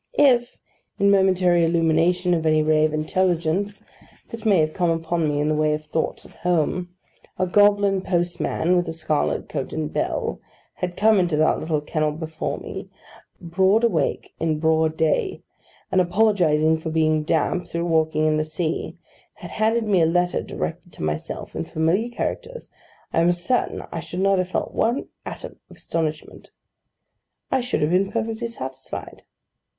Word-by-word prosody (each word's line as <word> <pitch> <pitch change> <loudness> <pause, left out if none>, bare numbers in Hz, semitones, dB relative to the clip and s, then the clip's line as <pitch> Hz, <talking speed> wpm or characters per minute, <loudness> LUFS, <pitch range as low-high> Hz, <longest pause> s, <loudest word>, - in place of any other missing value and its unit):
If, 245 -4 +4 0.4
in 200 - +1
the - - +6
momentary 180 -2 +3
illumination 170 +2 +2
of 165 -2 0
any 155 0 +3
ray 155 0 +3
of 155 - 0
intelligence 175 +4 0 0.5
that 225 -1 -5
may 200 -3 +5
have 155 -1 +1
come 175 -2 +1
upon 165 0 0
me 145 0 -1
in 150 - +1
the 155 - +2
way 155 0 +2
of 155 0 -8
thoughts 155 +1 -3
of - - -15
Home, 180 +1 0 0.5
a 185 - +1
goblin 200 0 +3
postman, 175 -1 0
with 175 -1 +1
a 165 - -3
scarlet 155 -2 -1
coat 130 - -4
and 155 -1 -3
bell, - - -2 0.4
had 180 -1 -4
come 215 -1 +4
into 175 -4 +1
that 155 - +3
little 155 -2 -1
kennel 155 0 -1
before 160 0 -4
me, - - -8 0.5
broad 190 +6 +2
awake 235 - 0
in 160 -1 0
broad 160 0 +1
day, 160 - 0 0.5
and, 185 - +4
apologising 175 -5 +2
for 160 - -4
being 155 -1 +2
damp 160 +3 0
through 170 0 -3
walking 160 -2 +1
in 155 0 +2
the 155 - +1
sea, 155 +1 -3 0.4
had - - -10
handed 225 +2 +1
me 195 -4 +3
a 160 - +4
letter 175 +1 +1
directed 175 +1 -5
to - - -8
myself, 75 0 -4
in 80 - -2
familiar 165 - 0
characters, 485 - -5 0.4
I 165 - +3
am 170 +1 +4
certain 175 +8 -1
I 165 - -4
should 175 +3 -5
not 195 -1 +3
have 185 0 -1
felt - - -2
one 240 +5 0 0.2
atom - - -8
of - - -15
astonishment: 155 -2 -4 1.0
I 265 - +2
should 245 -9 -1
have 150 - +1
been 195 +2 +2
perfectly 225 +1 -2
satisfied. 130 - -7
170 Hz, 170 wpm, -23 LUFS, 155-190 Hz, 1.0 s, the